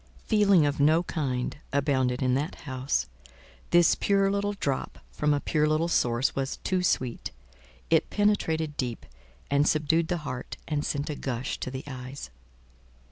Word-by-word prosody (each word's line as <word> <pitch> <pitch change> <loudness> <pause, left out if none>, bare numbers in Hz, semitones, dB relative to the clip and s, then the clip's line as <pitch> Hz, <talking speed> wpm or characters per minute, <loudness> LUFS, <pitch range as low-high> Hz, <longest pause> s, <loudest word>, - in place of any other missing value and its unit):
Feeling 200 -7 +4
of 145 0 -1
no 155 +4 +4
kind 135 -8 -2
abounded 130 -2 +1
in 125 -1 +2
that 145 +6 -2
house; 130 0 -1 0.6
this 175 -1 +5
pure 195 -1 +2
little 200 +1 0
drop 140 -9 -3
from 150 0 0
a 145 - +2
pure 150 +1 +1
little 155 +2 +1
source 120 -5 +1
was 135 0 -2
too 185 -1 +1
sweet: 130 -9 -1 0.6
it - - +3
penetrated 160 -7 +1
deep, 120 -3 -3 0.5
and 145 +1 +3
subdued 160 +2 +2
the 175 - 0
heart, 130 -2 -5
and 150 -2 -1
sent 145 +1 -2
a - - -4
gush 130 -2 -3
to - - -3
the 130 +1 -6
eyes. 130 - -8
145 Hz, 155 wpm, -27 LUFS, 130-165 Hz, 0.6 s, this